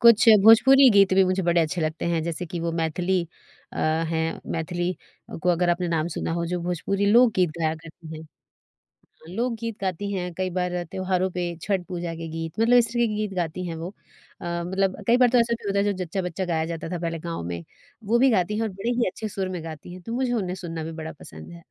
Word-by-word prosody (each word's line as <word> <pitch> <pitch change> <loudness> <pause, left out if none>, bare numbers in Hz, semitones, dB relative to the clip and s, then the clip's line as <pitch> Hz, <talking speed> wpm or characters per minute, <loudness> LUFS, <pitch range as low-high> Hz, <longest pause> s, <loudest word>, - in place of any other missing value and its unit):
कुछ 235 0 +7 0.2
भोजपुरी 265 +4 +8
गीत 195 -3 +5
भी 195 - +6
मुझे 185 +1 0
बड़े 170 0 +3
अच्छे 165 +2 -1
लगते 155 0 -2
हैं, 165 -2 0
जैसे 170 +1 -4
कि 170 +1 -5
वो 165 0 -2
मैथिली 175 +3 0 0.5
अ, - - -9
हैं, 160 +1 0
मैथिली 175 +2 -2 0.5
को 180 - +1
अगर 175 0 +2
आपने 175 0 0
नाम 165 -1 0
सुना - - -2
हो 170 0 -1
जो 175 +1 -2
भोजपुरी 185 +3 -1
लोकगीत 215 -8 +5
गाया 160 0 +1
करती 160 0 -11
हैं। 160 - -11 1.1
लोकगीत 230 -2 -2
गाती 195 +1 -2
हैं, 180 -2 -3
कई 185 +1 -2
बार 180 -1 0
अ, 175 - -1
त्योहारों 185 -1 0
पे, 175 -2 -3
छठ 195 -3 0
पूजा 175 -2 -4
के 165 0 -6
गीत, 165 0 -5
मतलब 240 +2 +5
इस 235 - +4
तरह 240 - +1
के 215 - -3
गीत 210 -1 -2
गाती 180 0 -2
हैं 165 -1 -4
वो। 165 +2 -5 0.5
अ, - - -9 0.2
मतलब 190 +1 0
कई 235 +1 +5
बार 250 -1 +5
तो 250 - +4
ऐसा 235 0 +2
भी 215 - -6
होता 200 0 +1
है 200 - +3
जो 205 - +1
जच्चा-बच्चा 180 +1 -3
गाया 165 -2 0
जाता 165 -1 -5
था 175 - -2
पहले 165 -1 -3
गाँव 165 - -5
में, 85 -1 -5 0.4
वो 230 +4 +2
भी 265 +2 +5
गाती 210 -1 +1
हैं 225 - -1
और 225 - 0
बड़े 200 +4 -4
ही 240 -1 +1
अच्छे 215 +4 -5
सुर 190 -2 -3
में 165 - -6
गाती 160 +1 -8
हैं, 180 0 -10
तो 230 - -6
मुझे 255 0 0
उन्हें 185 -6 -1
सुनना 165 -3 -5
भी 165 - -5
बड़ा 160 - -6
पसंद 80 +1 -11
है। 85 - -10
180 Hz, 235 wpm, -25 LUFS, 165-200 Hz, 1.1 s, भोजपुरी